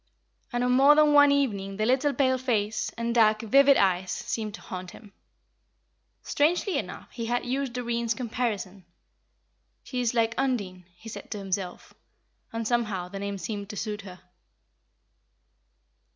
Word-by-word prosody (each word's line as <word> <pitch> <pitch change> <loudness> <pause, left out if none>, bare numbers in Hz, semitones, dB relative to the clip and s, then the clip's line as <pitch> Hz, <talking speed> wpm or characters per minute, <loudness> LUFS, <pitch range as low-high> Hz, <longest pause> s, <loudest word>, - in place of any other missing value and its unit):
And 240 0 -1
on 250 - +2
more 275 +4 +6
than 300 -1 +5
one 290 -1 +7
evening 200 -9 0
the 215 - 0
little 265 +4 +2
pale 260 -2 +1
face, 220 -4 -1
and 235 0 -1
dark, 215 -1 +4
vivid 275 +4 +5
eyes 185 -1 +2
seemed 215 -2 -4
to - - -13
haunt 185 -1 -7
him. 205 +1 -14 1.1
Strangely 350 +6 +1
enough - - -8
he 230 -2 -5
had 245 +1 -1
used 265 0 -2
Doreen's 235 -2 -1
comparison. 220 -6 -3 1.0
"She 250 -2 -3
is 245 0 0
like 225 -1 +2
Undine," 200 -9 -2
he 195 +6 -14
said 225 - -8
to 215 - -4
himself; 190 -2 -4 0.6
and 225 -1 -3
somehow, 215 -7 -1
the 195 +1 -7
name 200 0 -4
seemed 205 0 -5
to 210 - -7
suit 210 0 -4
her. 185 -2 -11
230 Hz, 150 wpm, -27 LUFS, 200-255 Hz, 1.1 s, one